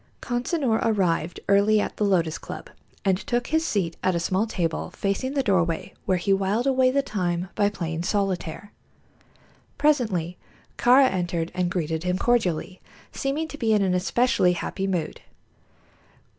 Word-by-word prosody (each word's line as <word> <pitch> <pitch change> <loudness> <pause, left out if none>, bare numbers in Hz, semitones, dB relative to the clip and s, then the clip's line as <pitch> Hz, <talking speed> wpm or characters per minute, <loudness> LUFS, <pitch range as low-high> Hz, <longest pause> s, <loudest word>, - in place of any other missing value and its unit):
Consinor 245 -1 0
arrived 180 -6 0
early 200 +2 +4
at - - -3
the - - 0
Lotus 170 -6 +1
Club - - -9 0.3
and 190 -1 +2
took 240 -1 -1
his 320 +1 +1
seat 185 - -1
at 185 -1 +1
a - - +1
small 190 +5 0
table 170 -6 -2
facing 260 +8 -2
the 275 - +1
doorway, 170 -6 0
where 185 - +3
he 185 +3 +1
whiled 195 +5 0
away 260 -1 +3
the 280 +2 +1
time 180 -6 -2
by 205 -1 +2
playing 165 -5 -4
solitaire. 195 -1 -2 1.1
Presently 215 - +1 0.4
Kāra 260 +2 +5
entered 175 -2 -2
and 180 -1 0
greeted 165 -2 -2
him 180 0 0
cordially, 190 -6 0 0.3
seeming 285 +4 -2
to 295 - -9
be 225 -2 +2
in 210 -2 +3
an 185 -2 +1
especially 185 0 +2
happy 195 +2 -3
mood. 180 -4 -2
195 Hz, 155 wpm, -25 LUFS, 175-240 Hz, 1.1 s, Kāra